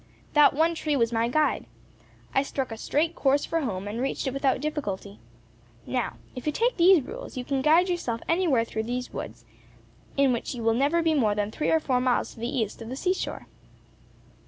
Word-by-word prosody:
That 295 -2 +6
one 325 +3 +3
tree 305 -2 -1
was 230 -3 +2
my 230 0 +2
guide. 305 +5 +1 0.7
I 270 - +4
struck 270 -2 -3
a - - -4
straight 315 +8 0
course 280 +1 +2
for 330 0 -1
home, 200 -7 -3
and 220 +4 -4
reached 270 +2 -2
it 265 - -1
without 275 -1 +1
difficulty. 210 - -4 0.7
Now, 250 -2 -2 0.2
if 255 +3 -7
you - - +3
take 475 +10 0
these 350 -3 +6
rules, 475 - -8
you 250 - -4
can 275 0 -1
guide 325 +6 +5
yourself 340 -11 -2
anywhere 325 -9 +2
through 220 -1 -4
these 245 +1 -4
woods, - - -7 0.7
in 275 -2 +4
which 240 +2 -3
you 235 - -5
will 225 0 +3
never 290 +8 +2
be 325 -1 +3
more 220 -8 +2
than 205 0 -1
three 300 - -1
or 320 - +4
four 255 -5 0
miles 250 -1 +1
to - - -15
the 235 +1 -2
east 235 -6 -2
of 225 - -7
the 255 - -4
sea 365 +7 +1
shore." - - -5
270 Hz, 210 wpm, -26 LUFS, 235-310 Hz, 0.7 s, That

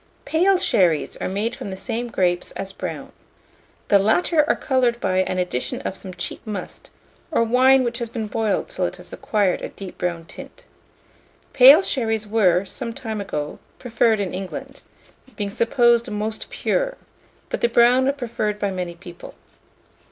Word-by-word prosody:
PALE 370 +4 +3
SHERRIES 175 - +2
are - - -3
made 215 +5 -2
from 255 -6 -7
the 190 - -6
same 235 +4 -3
grapes 180 -5 0
as 195 0 -6
brown. - - -6 0.8
The 200 - +6
latter 300 - +3
are - - +4
coloured 250 -3 +1
by 185 -3 0
an 185 0 0
addition 180 -9 -2
of - - -4
some 190 -1 -9
cheap 175 - -5
must, 205 -4 -7 0.4
or 290 -8 +2
wine 255 +3 +4
which 235 -1 -2
has 235 -2 -4
been 225 -1 -4
boiled 215 0 -1
till - - -2
it - - -7
has - - -14
acquired 205 -4 0
a - - -5
deep 195 -2 -10
brown 170 -2 -2
tint. - - -12 0.9
Pale 275 +7 +8
sherries 225 - -1
were, 200 -4 +2
some 230 +4 -6
time 220 -3 -5
ago, 150 -6 -4 0.2
preferred 230 -2 +1
in 195 -3 -2
England, 190 0 -7 0.5
being 205 -1 -3
supposed 235 +1 +3
most 215 +1 -4
pure; - - -1 0.5
but - - -3
the 235 - +3
brown 245 +2 +4
are - - +1
preferred 230 -6 -3
by 200 -1 -1
many 180 -2 -4
people. 175 0 -12
220 Hz, 165 wpm, -22 LUFS, 190-240 Hz, 0.9 s, Pale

